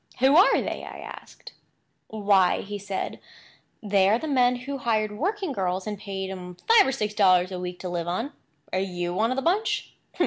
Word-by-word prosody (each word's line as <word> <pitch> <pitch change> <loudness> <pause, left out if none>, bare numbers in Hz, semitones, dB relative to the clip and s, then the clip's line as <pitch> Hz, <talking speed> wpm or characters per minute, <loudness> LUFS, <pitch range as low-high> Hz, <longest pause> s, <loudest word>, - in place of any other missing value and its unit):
"Who 265 +3 +4
are 370 - +6
they?" - - -4
I - - -8 0.2
asked. - - -15 0.5
"Why," 200 -4 +2
said 200 -1 -4 0.6
he, - - -7
"they 195 -1 +4
are 215 - +4
the 315 - -5
men 250 -3 +3
who 270 +3 -6
hired 215 -3 0
working 380 - -2
girls, 185 -5 -2
and 210 -1 -3
paid 190 -2 -5
'em 180 -2 -8
five 455 -6 +6
or - - +1
six 210 -4 -2
dollars 185 -3 +4
a 185 - -4
week 180 0 -5
to 185 - -4
live 175 -1 -3
on. 225 +11 -3 0.4
Are 185 - +1
you 175 -2 -3
one 220 +5 +1
of 255 - -1
the 270 - -2
bunch?" 400 +6 0
210 Hz, 200 wpm, -25 LUFS, 185-260 Hz, 0.6 s, are